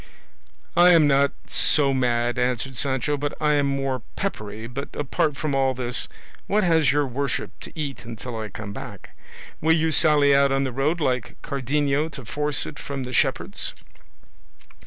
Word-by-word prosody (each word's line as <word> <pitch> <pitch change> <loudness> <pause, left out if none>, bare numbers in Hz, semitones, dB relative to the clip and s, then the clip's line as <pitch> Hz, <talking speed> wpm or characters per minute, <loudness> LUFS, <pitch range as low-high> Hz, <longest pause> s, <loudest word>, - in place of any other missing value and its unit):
"I 175 +1 +7
am 165 -3 +6
not 140 0 +4 0.2
so 140 -2 +3
mad," 120 -1 +1
answered 125 +1 -1
Sancho, 135 +2 0
"but 145 +1 -3
I 150 -1 +2
am 145 -1 +2
more 135 -2 -1
peppery; 110 - -4
but 130 +4 -5
apart 145 0 0
from 155 -2 -2
all 135 -1 +2
this, 125 -1 -1 0.4
what 210 +1 +2
has 165 -4 +4
your 145 +1 +2
worship 140 +2 -2
to - - -10
eat 140 -5 -4
until 120 +1 -7
I 110 -1 -4
come 100 +1 -7
back? - - -10 0.5
Will 160 +1 +4
you 160 0 +1
sally 150 -3 +5
out 140 0 +4
on 135 0 +2
the 130 - -2
road 150 +7 0
like 125 -4 -1
Cardenio 140 +2 0
to 135 - -8
force 150 +4 -1
it - - -8
from 140 -2 -5
the 125 0 -6
shepherds?" - - 0
140 Hz, 170 wpm, -24 LUFS, 125-150 Hz, 0.5 s, I